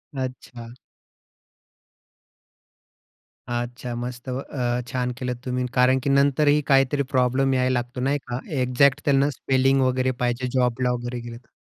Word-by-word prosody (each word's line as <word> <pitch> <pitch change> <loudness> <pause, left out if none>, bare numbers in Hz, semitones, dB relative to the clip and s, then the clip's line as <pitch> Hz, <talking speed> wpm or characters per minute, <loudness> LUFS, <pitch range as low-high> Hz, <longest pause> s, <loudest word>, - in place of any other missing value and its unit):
अच्छा. 125 -2 -6 2.9
अच्छा, 120 +1 -4
मस्त 125 +1 -6
अ, 125 -1 -2
छान 125 0 -2
केलत 125 -1 -3
तुम्ही. 125 0 -1
कारण 130 0 +4
की 140 - 0
नंतरही 145 +2 +3
काहीतरी 135 +1 +3
प्रॉब्लेम 130 +1 +2
यायला 130 0 +1
लागतो. 125 0 -3
नाही 140 +3 +1
का? 120 0 -3 0.2
एक्झॅक्ट 125 +2 +3
त्यांना 140 0 +3
स्पेलिंग 135 0 +1
वगैरे 130 0 +1
पाहिजे 120 +1 -1
जॉबला 125 0 +1
वगैरे 120 0 -4
गेलेतर. 120 0 -10
125 Hz, 125 wpm, -24 LUFS, 125-135 Hz, 2.9 s, कारण